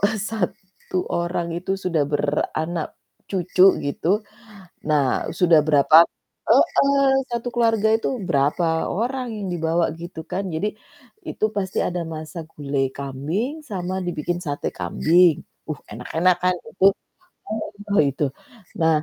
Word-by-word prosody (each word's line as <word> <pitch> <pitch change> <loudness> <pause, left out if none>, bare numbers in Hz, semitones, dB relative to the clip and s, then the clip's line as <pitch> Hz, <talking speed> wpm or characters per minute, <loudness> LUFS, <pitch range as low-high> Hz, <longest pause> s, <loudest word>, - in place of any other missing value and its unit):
eee, 205 +2 +2
1 190 -3 -4
orang 170 0 -1
itu 180 +3 -2
sudah 180 -5 0
beranak 155 +3 -2 0.3
cucu 185 -1 +1 0.2
gitu, 140 +3 -2 0.8
nah 145 -4 +2
sudah 170 -3 +6
berapa 155 +2 +7 0.4
heeh, 275 -1 +4
satu 235 0 -2
keluarga 225 -2 +3
itu 225 - -3 0.2
berapa 145 +5 +2 0.3
orang 250 +5 -2
yang 205 -2 -4
dibawa 165 0 +1 0.2
gitu 170 -1 -7
kan 195 +2 -1
jadi 200 +7 0 0.6
itu - - -2
pasti 190 -2 -2
ada 175 0 -3
masa 155 +2 -7
gulai 140 -2 -1
kambing 140 - -3 0.2
sama 185 -1 -3
dibikin 175 0 -2
sate 145 -1 -2
kambing. 175 0 +4 0.3
Uh 155 - -2
enak-enak 160 +11 +1
kan 180 0 +3 0.2
itu 190 - -1 1.1
oh 200 - +4
itu. 140 +2 -3 0.6
Nah. 160 -1 +4
175 Hz, 125 wpm, -22 LUFS, 155-195 Hz, 1.1 s, berapa